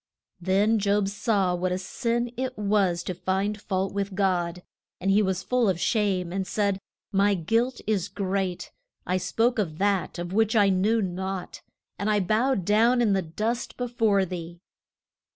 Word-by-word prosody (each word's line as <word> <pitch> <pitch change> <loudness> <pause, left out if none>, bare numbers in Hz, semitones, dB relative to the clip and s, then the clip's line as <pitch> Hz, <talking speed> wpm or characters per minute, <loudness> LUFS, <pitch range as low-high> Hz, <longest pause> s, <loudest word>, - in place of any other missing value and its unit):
Then 200 +5 +2
Job 200 0 +2
saw 200 -2 +1
what 180 +1 -1
a 180 - 0
sin 235 +5 -2
it 255 +1 -3
was 200 -4 +1
to 185 - -3
find 195 +4 -2
fault 190 -1 -2
with 200 -1 -3
God. 180 -3 0 0.4
And 195 +2 +1
he 205 +2 +5
was 190 -2 -1
full 250 -2 +2
of 180 -3 0
shame, 190 -5 0
and 190 -1 -2
said: 200 -3 0 0.3
My 200 0 +3
guilt 230 +9 0
is 205 -4 0
great; 190 -2 -3 0.3
I 180 - +1
spoke 225 +7 +1
of 160 -7 -2
that 200 -2 0
of 175 +1 -5
which 220 +1 +2
I 205 -2 +5
knew 205 +4 +2
naught, 190 0 -4 0.4
and 200 +2 0
I 210 -1 +3
bow 220 +8 +2
down 220 +6 +3
in 225 -4 +3
the 190 - +2
dust 215 +8 -3
be 245 - -2
fore 220 -5 +2
thee. 170 -1 -7
200 Hz, 170 wpm, -26 LUFS, 185-215 Hz, 0.4 s, he